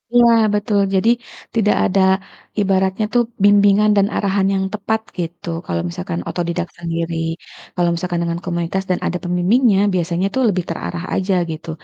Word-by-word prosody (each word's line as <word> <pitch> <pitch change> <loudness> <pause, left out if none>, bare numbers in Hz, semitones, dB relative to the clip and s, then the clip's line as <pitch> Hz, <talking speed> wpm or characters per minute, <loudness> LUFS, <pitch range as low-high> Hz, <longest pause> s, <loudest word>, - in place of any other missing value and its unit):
Iya, 240 -1 +6 0.2
betul, 205 0 +1 0.2
jadi 190 +4 +3 0.5
tidak 210 -2 +3
ada 195 0 +2 0.6
ibaratnya 190 +1 +1
tuh 240 -1 +4 0.2
bimbingan 205 +1 +5
dan 200 0 +4
arahan 195 -1 +1
yang 190 0 0
tepat 220 +1 -1 0.2
gitu, 170 0 -5 0.2
kalau 85 -1 -2
misalkan 85 0 -4
autodidak 175 0 -2
sendiri, 165 0 -3 0.6
kalau 175 -1 +2
misalkan 175 0 -2
dengan 170 0 -2
komunitas 175 +2 -2
dan 180 - 0
ada 180 - -1
pembimbingnya, 190 +5 +3
biasanya 175 +1 0
tuh 265 - +2
lebih 185 -3 0
terarah 175 0 -4
aja 195 +1 0 0.2
gitu 160 +1 -7
185 Hz, 150 wpm, -19 LUFS, 170-205 Hz, 0.6 s, Iya